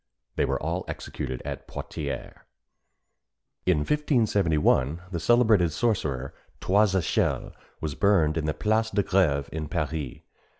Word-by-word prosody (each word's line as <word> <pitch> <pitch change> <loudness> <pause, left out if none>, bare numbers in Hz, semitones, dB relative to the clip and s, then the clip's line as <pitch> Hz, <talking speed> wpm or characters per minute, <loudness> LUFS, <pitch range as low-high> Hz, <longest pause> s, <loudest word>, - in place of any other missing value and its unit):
They - - +2
were - - -1
all 85 +4 -2
executed 65 - -5
at - - -6
Poitiers. 75 -3 -5 1.3
In 90 -3 +4
1571 95 - +2
the 85 - -2
celebrated 110 -5 +4
sorcerer 75 - -1 0.3
Trois 100 0 +3
Echelles 90 -4 0 0.3
was 75 -2 -2
burned 85 -4 +3
in 80 -2 -1
the 75 - -1
Place 110 +4 +1
de 100 -1 +1
Grève 85 -9 +2
in 80 -1 -4
Paris. 75 -3 -3
85 Hz, 125 wpm, -26 LUFS, 75-105 Hz, 1.3 s, In